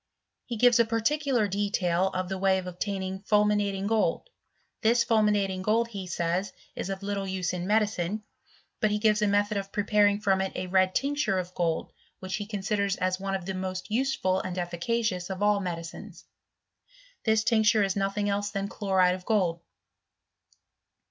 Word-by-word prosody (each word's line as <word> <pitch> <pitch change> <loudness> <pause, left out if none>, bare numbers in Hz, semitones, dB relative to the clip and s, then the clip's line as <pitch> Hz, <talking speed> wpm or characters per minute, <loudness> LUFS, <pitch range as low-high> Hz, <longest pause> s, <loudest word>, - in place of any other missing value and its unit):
He 235 - -4
gives 245 +1 +5
a 235 - +5
particular 235 +1 +1
detail 190 -3 0
of 185 -1 -3
the 190 0 -4
way 190 0 +3
of 185 - -4
obtaining 190 +1 -4
fulminating 205 -1 +1
gold. 220 - +1 0.5
This 235 +2 +4
fulminating 205 -4 +2
gold 225 +4 +1
he 195 -4 -6
says 175 +3 -1 0.2
is - - -4
of 195 0 -4
little 200 -1 -2
use 185 -2 -2
in 180 0 -3
medicine; 210 -1 0 0.6
but 215 - +2
he 210 - 0
give* 210 0 +2
a 210 - +3
method 205 +1 +1
of 195 0 -4
preparing 205 0 +2
from 195 -2 +2
it 190 - -2
a - - -3
red 185 0 +2
tincture 280 -7 0
of 180 0 -4
gold, 165 -3 -1 0.3
which 185 +2 -4
he 205 -1 -5
considers 200 -1 -1
as 185 0 -1
one 195 0 -2
of 190 -2 -5
the 190 - -3
most 185 +1 -5
useful 220 -6 +1
and 185 -1 -5
effi"* 175 -1 -3
cacious 215 -4 -1
of 190 +1 -3
all 205 -1 +3
medicines: 170 -3 -7 1.0
this 220 -1 +3
tincture 220 -2 +3
is 195 -1 0
nothing 200 +1 -1
els& 205 0 0
than 200 -1 -3
chloride 190 -3 +2
of 185 0 -6
gold. 180 -6 +1
200 Hz, 175 wpm, -27 LUFS, 185-210 Hz, 1.0 s, gives